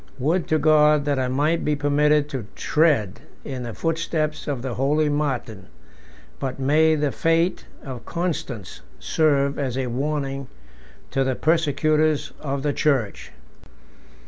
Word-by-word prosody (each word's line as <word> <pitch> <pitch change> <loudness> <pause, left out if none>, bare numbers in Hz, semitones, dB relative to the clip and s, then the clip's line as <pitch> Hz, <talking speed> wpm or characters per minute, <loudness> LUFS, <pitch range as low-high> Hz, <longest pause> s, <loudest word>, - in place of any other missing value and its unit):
Would 160 +7 0
to 155 - +2
God 150 -1 +4
that 145 -2 0
I 130 - 0
might 150 +6 +1
be 150 - +1
permitted 145 0 +2
to 130 -7 -5
tread 150 - +1 0.3
in 130 -3 -5
the 120 -2 -6
footsteps 160 -2 -2
of 135 -4 -3
the 130 -2 -3
holy 150 +5 +1
Martin! 130 -10 -2 0.7
but 135 -1 -4
may 155 +4 +3
the 150 -2 0
fate 165 +4 +1 0.2
of 130 -4 -7
Constans 150 - -4 0.2
serve 140 -3 +1
as 130 -3 -2
a 135 - -1
warning 135 +1 -2 0.6
to 135 - +1
the 130 -1 0
persecutors 155 -1 +1
of 140 -2 -3
the 145 -1 0
church! 135 -10 0
145 Hz, 140 wpm, -23 LUFS, 130-155 Hz, 0.7 s, God